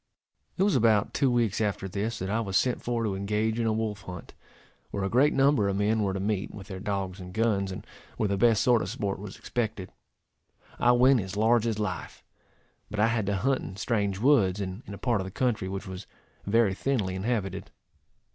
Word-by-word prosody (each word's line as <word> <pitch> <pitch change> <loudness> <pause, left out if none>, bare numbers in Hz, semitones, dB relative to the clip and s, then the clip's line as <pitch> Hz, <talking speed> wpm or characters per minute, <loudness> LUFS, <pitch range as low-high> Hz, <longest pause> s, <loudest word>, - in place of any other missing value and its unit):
It 190 - +3
was 200 - +3
about 110 -4 +3
two 135 - +2
weeks 115 -4 +1
after 100 -2 -1
this 105 +4 -3
that 95 - -4
I 110 - +1
was 100 -3 0
sent 125 -1 +1
for 120 -1 -1
to 105 -3 0
engage 105 +3 -1
in 115 - +1
a - - +2
wolf 110 -2 -2
hunt, 90 -2 -9 0.6
where 100 - -3
a 95 - 0
great 140 +5 +4
number 135 -7 +3
of 95 - -1
men 105 +2 +1
were 100 -2 0
to - - -2
meet, 100 0 -1
with 100 -1 -10
their 95 -1 -6
dogs 100 -2 -3
and 90 0 -8
guns, 105 -3 0
and 95 - -7 0.3
where 105 - +1
the 100 - 0
best 110 +1 +3
sort 120 -3 +4
of - - -3
sport 100 -1 -3
was 100 -1 -8
expected. 110 -6 -3 0.9
I 120 - +5
went 125 +1 +5
as 95 +1 -6
large 115 +1 +3
as 110 -2 -1
life, 105 -4 -4 0.7
but 105 - -5
I 110 +2 +4
had 115 -4 0
to 100 - +1
hunt 130 +7 +1
in 95 - -7
strange 100 -2 -1
woods, 105 -6 +3
and 95 +2 -4
in 100 - -6
a - - -10
part 115 -3 0
of - - -5
the - - -5
country 105 -3 -1
which 95 0 -5
was 95 +1 -8 0.4
very 110 -1 +3
thinly 105 -4 -1
inhabited. 100 +1 -2
105 Hz, 220 wpm, -28 LUFS, 95-115 Hz, 0.9 s, I